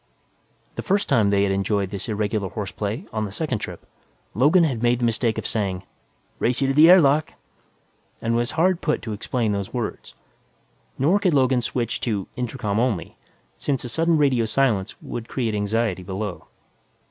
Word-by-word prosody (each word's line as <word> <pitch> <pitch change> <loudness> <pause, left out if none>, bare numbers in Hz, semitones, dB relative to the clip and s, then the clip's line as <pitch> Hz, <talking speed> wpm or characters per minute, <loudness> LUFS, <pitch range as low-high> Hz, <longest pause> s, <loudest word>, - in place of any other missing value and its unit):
The - - -1
first 200 +1 0
time 115 -7 +3
they 100 0 +3
had 100 - +1
enjoyed 100 0 0
this 100 +3 -5
irregular 105 -2 -1
horseplay, 105 - -4
on 110 -1 -1
the 100 - -6
second 125 +1 -2
trip, - - -7 0.5
Logan 150 - +4
had 130 -8 0
made 120 0 +3
the 120 - 0
mistake 115 0 +1
of - - -4
saying, 95 -4 -2 0.6
"Race 125 +1 +1
you 135 - +1
to - - +2
the 155 +4 +7
air 185 +1 +9
lock!", 145 0 +2 0.9
and 115 +1 -1
was 120 +1 0
hard 180 +1 +3
put 150 - -1
to 110 - -4
explain 110 +1 -1
those 100 +3 -3
words. 120 -3 -5 0.8
Nor 165 +10 +3
could 180 -6 +2
Logan 130 -2 +3
switch 120 -1 -2
to 105 -5 -2
"intercom 115 -4 -2
only," 115 -8 -1 0.4
since 140 -3 -2
a 125 - -5
sudden 165 +6 +2
radio 135 -6 +3
silence 110 -4 +1
would 115 -1 -6
create 115 -5 -1
anxiety 105 -1 0
below. 95 +1 -5
115 Hz, 175 wpm, -23 LUFS, 105-135 Hz, 0.9 s, air